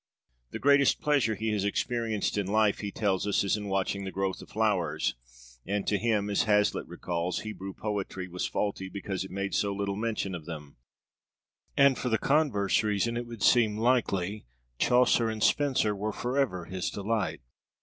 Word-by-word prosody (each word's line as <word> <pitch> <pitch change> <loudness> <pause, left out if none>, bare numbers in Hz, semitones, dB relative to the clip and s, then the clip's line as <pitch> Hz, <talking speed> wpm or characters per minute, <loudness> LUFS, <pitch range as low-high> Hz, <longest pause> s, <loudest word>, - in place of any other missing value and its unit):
The - - -5
greatest 140 -1 +4
pleasure 140 -7 +2
he 110 +2 -2
has 105 -2 0
experienced 110 +1 -1
in 100 -2 -1
life, 105 0 +2
he 100 - -3
tells 100 -2 0
us, 100 - +2
is 100 - +1
in 105 -1 -5
watching 95 0 -1
the 95 - -4
growth 95 -1 -2
of - - -12
flowers; 95 -8 0 0.5
and 100 +1 -2
to 105 - +1
him 110 -2 +1
as 100 - +2
Hazlitt 105 -1 +2
recalls 85 0 -3
Hebrew 100 -3 -7
poetry 100 -3 -4
was 90 0 -3
faulty 100 -2 -2
because 95 0 -4
it 95 - -8
made 100 +1 -3
so 100 - +1
little 100 0 -2
mention 110 -3 -2
of 85 -4 -6
them; 75 -4 -8 1.0
and 140 -2 +5
for 125 - -1
the 110 - +2
converse 135 -10 +2
reason, 110 +2 0
it 120 0 -3
would 115 -4 -7
seem 110 -4 +4
likely, 110 - 0 0.3
Chaucer 125 -2 +4
and 110 -1 -3
Spenser 130 -7 +2
were 105 +2 -2
forever 120 -8 -1
his 95 -1 -3
delight. 105 - -2
105 Hz, 175 wpm, -29 LUFS, 95-115 Hz, 1.0 s, and